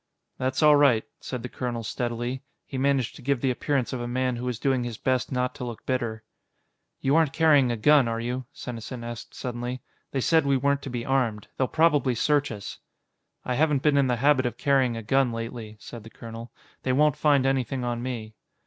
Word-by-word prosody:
"That's 130 +3 0
all 150 -1 +8
right," 140 -6 +4 0.2
said 125 -3 -6
the - - -3
colonel 120 -2 -4
steadily. 120 +3 -3 0.2
He 135 - -5
managed 135 -3 +1
to - - -12
give 140 0 0
the 130 +1 +1
appearance 130 -1 -1
of 125 - -3
a 120 - -3
man 125 +1 0
who 120 +1 -5
was 125 -2 -2
doing 130 0 +1
his 120 -3 -5
best 130 +2 0
not 125 -1 0
to - - -7
look 120 -2 -7
bitter. 115 -4 -2 0.8
"You 135 +2 +2
aren't 160 -4 +3
carrying 150 -6 +4
a 120 - -2
gun, 140 +3 +5
are 115 0 -2
you?" 125 +2 -3
Senesin 120 -1 -7
asked 120 -1 -7
suddenly. 125 0 -4 0.3
"They 135 - -1
said 160 +5 +3
we 140 -1 +2
weren't 140 +1 +1
to 135 - -6
be 120 -1 -4
armed. 120 -6 0
They'll 130 - +1
probably 145 -5 +3
search 145 +3 +2
us." 105 -2 -7 0.7
"I 125 - -1
haven't 145 0 +2
been 150 -2 +4
in 140 -2 +4
the 125 - +2
habit 135 +1 +3
of 120 - -5
carrying 135 -4 +2
a 115 - -6
gun 135 +3 +2
lately," 115 -1 -6
said 115 -1 -10
the 115 - -11
colonel. 115 +1 -9 0.3
"They 130 - 0
won't 150 +1 +4
find 145 -3 +3
anything 135 -1 0
on 120 -1 -2
me." 115 -4 -5
125 Hz, 210 wpm, -26 LUFS, 120-140 Hz, 0.8 s, all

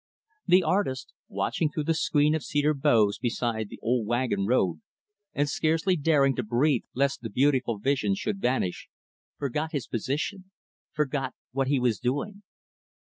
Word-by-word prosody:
The 180 +1 +5
artist 170 -11 -1
watching 155 - -1
through 150 0 -3
the 165 +2 +1
screen 150 -1 +2
of 160 -3 -1
cedar 145 +3 +1
boughs 110 -7 +2
beside 115 -3 -2
the - - -9
old 120 -2 0
wagon 120 -5 0
road 90 -10 +1 0.5
and 145 +1 0
scarcely 165 +5 +1
daring 140 -4 +3
to 125 - 0
breathe 120 +4 +1
lest 140 +2 0
the 115 - -5
beautiful 130 -1 +1
vision 105 -3 +1
should 100 0 -3
vanish 120 -8 -1 0.5
forgot 150 +4 -3
his 140 -5 -2
position 150 - -3 0.4
forgot 140 -3 -2 0.2
what 135 +1 0
he 140 -1 +2
was 120 -5 +1
doing. 145 +12 -2
135 Hz, 150 wpm, -27 LUFS, 120-150 Hz, 0.5 s, The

